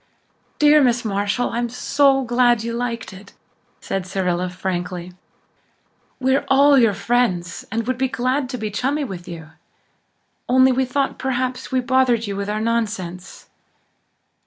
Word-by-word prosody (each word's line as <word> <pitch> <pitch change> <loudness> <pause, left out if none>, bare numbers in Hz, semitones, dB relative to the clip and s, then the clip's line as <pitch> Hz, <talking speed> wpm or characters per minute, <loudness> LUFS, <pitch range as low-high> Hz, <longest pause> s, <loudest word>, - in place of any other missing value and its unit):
"Dear 300 0 +6
Miss 245 -2 +2
Marshall, 205 +4 -1
I'm 240 0 -2
so 270 +2 +2
glad 240 -2 +2
you 230 0 -3
liked 235 -3 -4
it," 190 +2 -14 0.5
said 190 -1 -3
Cyrilla 180 -1 -1
frankly. 180 -1 -4 1.1
"We're 265 +1 +2
all 280 +2 +5
your 225 -5 +3
friends 190 -7 -1
and 225 +1 -2
would 255 0 -2
be 265 - +2
glad 255 +2 -1
to 250 - -4
be 215 -2 -4
chummy 275 +8 -1
with 185 -9 -7
you. 165 -2 -9 1.0
Only 260 +1 +5
we 260 +1 +1
thought 270 +2 -2
perhaps 255 0 -2
we 260 -1 +1
bothered 250 -2 +2
you 200 -1 -4
with 200 +1 -4
our 210 +1 -1
nonsense." 210 -6 -3
235 Hz, 145 wpm, -21 LUFS, 195-260 Hz, 1.1 s, Dear